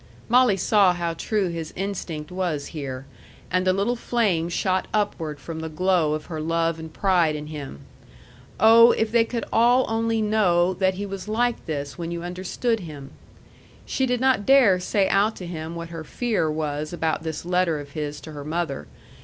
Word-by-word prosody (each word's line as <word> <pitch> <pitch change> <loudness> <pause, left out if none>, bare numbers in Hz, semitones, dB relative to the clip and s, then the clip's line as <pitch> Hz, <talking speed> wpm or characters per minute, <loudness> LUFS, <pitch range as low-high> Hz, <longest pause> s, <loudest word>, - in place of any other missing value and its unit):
Molly 245 -4 +5
saw 195 -1 +4
how 170 -1 -2
true 195 +3 -1
his 165 -2 -5
instinct 175 -5 -4
was 175 -6 -2
here; 135 -4 -5 0.5
and 185 +1 +1
a - - +6
little 200 +6 0
flame 205 -9 0
shot 185 +1 0
upward 160 -8 -1
from 160 +2 -7
the 160 0 -4
glow 170 -2 +1
of 155 - -6
her 160 -3 -5
love 165 +1 0
and 160 0 -8
pride 175 -4 +2
in 150 0 -5
him. 145 - -8 0.8
Oh, 230 +2 +8
if 220 -1 -1
they 235 0 +4
could 230 0 -4
all 245 +3 +4
only 225 0 0
know 190 -5 +2
that 190 0 +1
he 200 +2 -4
was 195 0 -6
like 240 +2 0
this 145 0 -4
when 170 -1 -4
you 170 0 -4
understood 185 +6 -2
him! 150 -6 -9 0.7
She 265 - 0
did 250 -1 0
not 260 -4 +2
dare 255 -9 +6
say 195 +2 +1
out 205 +3 +2
to 180 - -8
him 165 -1 -6
what 170 0 -6
her 165 -1 -7
fear 215 -3 -1
was 150 -1 -3
about 165 -2 -1
this 160 0 -5
letter 180 -3 +1
of 145 -1 -9
his 150 0 -4
to 160 - -9
her 145 -1 -7
mother. 155 -2 -3
175 Hz, 185 wpm, -24 LUFS, 160-210 Hz, 0.8 s, Oh